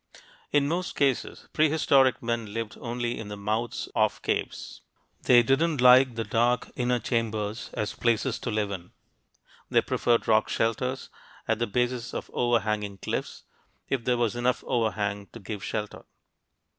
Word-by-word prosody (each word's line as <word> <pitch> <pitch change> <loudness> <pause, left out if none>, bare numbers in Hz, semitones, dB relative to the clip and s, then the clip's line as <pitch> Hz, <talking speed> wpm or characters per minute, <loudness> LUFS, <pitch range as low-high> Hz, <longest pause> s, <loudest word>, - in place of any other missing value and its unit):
In 145 -1 +3
most 175 +3 -2
cases, 135 -3 0
prehistoric 145 -5 +3
men 115 -3 -3
lived 115 -2 -4
only 120 0 -3
in 110 - -6
the 105 0 -6
mouths 110 +4 -2
of - - +1
caves. - - -3 0.4
They 120 -1 +6
didn't 145 +5 +2
like 125 0 +7
the 115 - -1
dark 120 +2 +1
inner 125 0 +1
chambers 110 -2 -2
as 105 - -2
places 115 +1 0
to - - -4
live 105 -2 -1
in. 90 -2 -7 0.8
They - - +3
preferred 120 -1 +1
rock 110 -1 +3
shelters, 125 +4 -1 0.4
at 110 -1 +1
the 120 - 0
bases 125 +2 -1
of - - -5
overhanging 105 -4 0
cliffs, - - -4 0.5
if 135 -3 -1
there 125 0 +1
was 120 -1 0
enough 120 +1 0
overhang 105 -4 -1
to 115 - -9
give 100 -1 -6
shelter. 105 -1 -4
115 Hz, 150 wpm, -27 LUFS, 110-125 Hz, 0.8 s, like